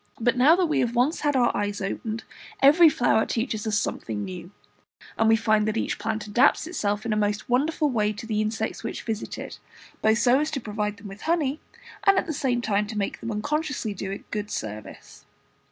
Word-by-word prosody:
But 240 Hz, +2 st, +2 dB
now 275 Hz, +6 st, +6 dB
that 365 Hz, 0 st, +2 dB
we 310 Hz, -, 0 dB
have 240 Hz, 0 st, 0 dB
once 260 Hz, +7 st, +2 dB
had 290 Hz, -2 st, 0 dB
our 245 Hz, -2 st, +3 dB
eyes 205 Hz, 0 st, -2 dB
opened, 215 Hz, +3 st, -4 dB, 0.4 s
every 310 Hz, +5 st, +7 dB
flower 245 Hz, -5 st, +2 dB
teaches 230 Hz, -2 st, -2 dB
us 210 Hz, -1 st, +1 dB
something 110 Hz, -, -3 dB
new, 180 Hz, -1 st, -8 dB, 0.7 s
and 225 Hz, 0 st, +3 dB
we 225 Hz, -, +6 dB
find 215 Hz, -1 st, +2 dB
that 215 Hz, +1 st, -1 dB
each -, -, -2 dB
plant 215 Hz, 0 st, -2 dB
adapts 215 Hz, +8 st, +3 dB
itself 210 Hz, -, -2 dB
in 225 Hz, -, 0 dB
a -, -, 0 dB
most 210 Hz, -1 st, -1 dB
wonderful 295 Hz, +5 st, +1 dB
way 215 Hz, -6 st, +1 dB
to 210 Hz, +2 st, -8 dB
the 215 Hz, -1 st, 0 dB
insects 215 Hz, +1 st, -3 dB
which -, -, -5 dB
visit 220 Hz, -2 st, -4 dB
it, -, -, -8 dB, 0.4 s
both 220 Hz, 0 st, +3 dB
so 245 Hz, +3 st, +4 dB
as 305 Hz, +1 st, 0 dB
to 300 Hz, -3 st, -3 dB
provide 210 Hz, -2 st, -3 dB
them 205 Hz, +1 st, -10 dB
with 195 Hz, +1 st, -10 dB
honey, 310 Hz, -3 st, 0 dB, 0.4 s
and 395 Hz, -2 st, +5 dB
at -, -, +2 dB
the 320 Hz, -, -3 dB
same 260 Hz, -4 st, 0 dB
time 210 Hz, -2 st, 0 dB
to 215 Hz, 0 st, -6 dB
make 200 Hz, -, -2 dB
them 230 Hz, -, -5 dB
unconsciously 270 Hz, +1 st, -2 dB
do 195 Hz, 0 st, -5 dB
it 195 Hz, -, -8 dB
good 210 Hz, -1 st, -3 dB
service. 110 Hz, -, -7 dB
225 Hz, 215 wpm, -25 LUFS, 210-265 Hz, 0.7 s, every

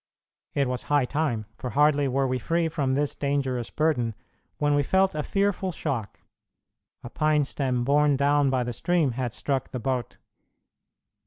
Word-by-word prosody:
It 140 Hz, -2 st, +2 dB
was 125 Hz, -1 st, -2 dB
high 145 Hz, -3 st, +3 dB
time, 125 Hz, -6 st, -1 dB
for 125 Hz, -, -4 dB
hardly 145 Hz, +1 st, +3 dB
were 135 Hz, +1 st, +1 dB
we 130 Hz, -1 st, -1 dB
free 165 Hz, +6 st, 0 dB
from 140 Hz, -5 st, 0 dB
this 145 Hz, +1 st, 0 dB
dangerous 135 Hz, -5 st, -1 dB
burden 125 Hz, -8 st, 0 dB, 0.4 s
when 145 Hz, 0 st, +1 dB
we 145 Hz, -, +3 dB
felt 190 Hz, +6 st, +2 dB
a 155 Hz, -, -2 dB
fearful 195 Hz, +2 st, 0 dB
shock. 120 Hz, -9 st, -4 dB, 0.8 s
A 120 Hz, -, -7 dB
pine 155 Hz, -1 st, +2 dB
stem 130 Hz, -3 st, -1 dB
borne 145 Hz, +2 st, +3 dB
down 145 Hz, 0 st, +3 dB
by 130 Hz, -1 st, +1 dB
the 120 Hz, 0 st, -4 dB
stream 165 Hz, +2 st, +1 dB
had 120 Hz, 0 st, -3 dB
struck 135 Hz, +2 st, -2 dB
the 125 Hz, -, -5 dB
boat. 125 Hz, -1 st, -2 dB
140 Hz, 165 wpm, -26 LUFS, 125-150 Hz, 0.8 s, high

